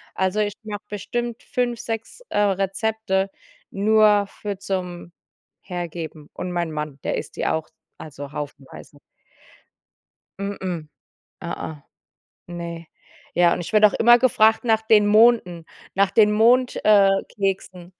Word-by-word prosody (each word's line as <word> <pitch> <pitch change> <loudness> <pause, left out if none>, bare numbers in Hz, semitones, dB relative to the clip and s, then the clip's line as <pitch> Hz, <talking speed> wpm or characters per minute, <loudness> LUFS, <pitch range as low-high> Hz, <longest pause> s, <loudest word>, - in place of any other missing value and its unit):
Also, 190 +2 0
ich 205 -1 0
mache 210 -1 -6
bestimmt 235 +3 -4
5, 245 -3 -2
6, 225 - -6
äh, - - -3
Rezepte 195 0 0 0.4
nur 210 0 +4
für 205 0 -6
zum 180 -3 -5 0.5
Hergeben. 165 -4 -7
Und 180 - -5
mein 175 -2 -2
Mann, 150 -2 -5
der - - -1
isst - - -7
die - - -2
auch, 160 -1 -1 0.3
also 145 -2 -9
haufenweise. 145 -1 -9 1.4
M-m. 190 -5 -4 0.6
Ä-ä. 170 -2 -5 0.7
Ne. 170 -1 -7 0.5
Ja, 175 -1 +4
und - - -3
ich 175 - -8
werde 215 0 +7
auch - - -6
immer 240 +1 +7
gefragt 220 -3 +3
nach 220 -2 +2
den 220 -1 +4
Monden, 210 -6 +4 0.3
nach 195 0 +2
den 210 0 +5
Mond 240 +4 +3
äh, 205 -2 +6 0.3
keksen. 185 -2 -3
195 Hz, 130 wpm, -22 LUFS, 175-220 Hz, 1.4 s, werde